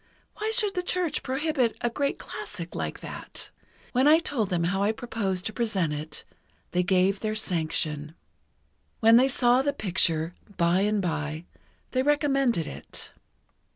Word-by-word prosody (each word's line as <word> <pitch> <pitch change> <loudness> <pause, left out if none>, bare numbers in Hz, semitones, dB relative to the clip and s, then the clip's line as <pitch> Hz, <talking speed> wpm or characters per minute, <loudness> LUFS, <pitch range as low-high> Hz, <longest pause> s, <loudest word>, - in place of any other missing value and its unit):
Why 430 +1 -1
should 440 -3 +2
the 365 - 0
Church 360 -2 -1
prohibit 265 -3 0
a 240 -1 0
great 280 +3 -1
classic, - - -7
like - - -4
that? - - -6 0.4
When 260 +3 +3
I 310 +2 +8
told 255 - -1
them 175 -3 0
how 185 +3 0
I 205 +2 +3
proposed 210 -6 -3
to 220 - -2
present 195 -10 0
it, 150 +1 -6 0.5
they 180 - +2
gave 190 +1 +2
their 215 -1 -2
sanction. 155 -5 -1 0.8
When 225 +1 +7
they 260 +2 +5
saw 245 0 +4
the 285 +1 0
picture, 175 - +1 0.2
by 170 +1 +3
and 205 0 +1
by, 155 -1 -2 0.5
they 255 - +2
recommended 275 - +2
it. - - -7
215 Hz, 155 wpm, -27 LUFS, 175-270 Hz, 0.8 s, I